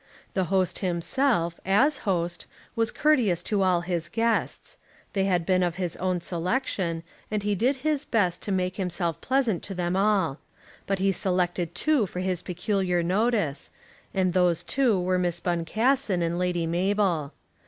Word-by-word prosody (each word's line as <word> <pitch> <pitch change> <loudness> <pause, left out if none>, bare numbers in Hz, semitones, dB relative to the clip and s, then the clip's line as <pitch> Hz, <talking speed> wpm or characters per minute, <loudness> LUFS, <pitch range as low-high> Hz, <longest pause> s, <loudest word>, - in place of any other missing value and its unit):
The 190 -2 +1
host 185 0 0
himself, 175 0 0
as 260 - +3
host, 175 -2 -1 0.3
was 225 -1 +1
courteous 245 - +2
to 205 -2 0
all 180 -2 +3
his 175 -2 -2
guests. 230 - -1 0.3
They 195 -2 +1
had 180 -3 +1
been 185 0 +2
of 175 -1 0
his 180 -3 -3
own 185 -1 -1
selection, 175 -2 -2 0.3
and 210 -1 -2
he 205 0 +1
did 245 +8 +2
his 300 -2 +1
best 205 - 0
to 205 - -3
make 185 -1 -1
himself 175 -3 -2
pleasant 255 -8 +1
to 195 - -6
them 175 0 -1
all. 190 -7 +2 0.5
But 195 - +1
he 195 +1 +2
selected 180 -2 -1
two 295 -9 +2
for 180 - -6
his 185 -2 -1
peculiar 180 -1 -1
notice, 190 - 0 0.4
and 185 -2 +1
those 180 -3 +2
two 250 -8 +2
were 180 0 +1
Miss 175 -1 -1
Boncassen 190 +4 +1
and 170 +1 -1
Lady 180 -2 0
Mabel. 175 -3 0
185 Hz, 160 wpm, -26 LUFS, 175-210 Hz, 0.5 s, as